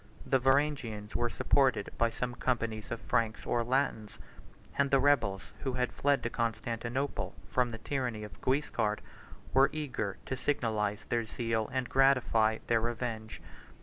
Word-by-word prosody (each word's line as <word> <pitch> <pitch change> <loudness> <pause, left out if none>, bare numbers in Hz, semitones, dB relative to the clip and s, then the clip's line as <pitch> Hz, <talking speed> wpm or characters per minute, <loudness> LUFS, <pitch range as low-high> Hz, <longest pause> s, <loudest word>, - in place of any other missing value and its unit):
The 135 - +3
Varangians 135 -6 +1
were 120 0 +1
supported 130 -5 +2
by 115 - +4
some 120 +2 -3
companies 115 -3 -2
of 115 - -3
Franks 110 -1 0
or 120 -1 +1
Latins; 115 -4 0 0.6
and 140 0 +2
the 135 - +4
rebels, 120 -9 +3 0.2
who 130 - -2
had 125 -1 -1
fled 145 0 +2
to 115 - 0
Constantinople 120 +3 -2
from 125 -1 +1
the 115 - -5
tyranny 125 -4 -2
of 105 - -10
Guiscard, 130 -6 0 0.5
were 135 +2 +6
eager 130 -10 -3
to 130 - -2
signalize 110 -6 -1
their 115 -1 0
zeal 110 0 -2
and 130 -1 -1
gratify 125 -5 +4
their 115 -1 +2
revenge. 115 -2 -4
120 Hz, 150 wpm, -31 LUFS, 110-135 Hz, 0.6 s, were